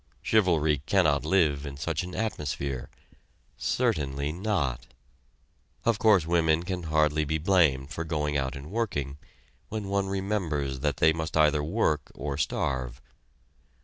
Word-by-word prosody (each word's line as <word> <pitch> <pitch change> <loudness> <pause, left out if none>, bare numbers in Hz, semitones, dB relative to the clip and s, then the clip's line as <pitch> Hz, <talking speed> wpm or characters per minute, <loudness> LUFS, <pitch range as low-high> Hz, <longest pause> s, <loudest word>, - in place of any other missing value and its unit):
Chivalry 80 -9 +3
cannot 75 -8 +3
live 75 -4 +2
in 70 -1 -7
such 75 +2 -2
an 90 0 -7
atmosphere. 70 - -3 0.7
Certainly 70 0 -1
not! 85 - -2 1.0
Of 115 -3 +2
course 105 -7 +5
women 80 -1 +2
can 90 0 -3
hardly 75 0 +2
be 80 +1 -1
blamed 80 -5 +2
for 80 - -3
going 75 -2 -2
out 70 -1 -1
and 70 +5 -9
working 75 - -2 0.5
when 105 -2 -4
one 100 0 0
remembers 90 -9 -2
that 75 +1 -1
they 80 0 +4
must 80 0 -3
either 75 -1 +4
work 80 -4 0
or 70 -1 -4
starve. 65 -3 -2
80 Hz, 135 wpm, -27 LUFS, 70-90 Hz, 1.0 s, course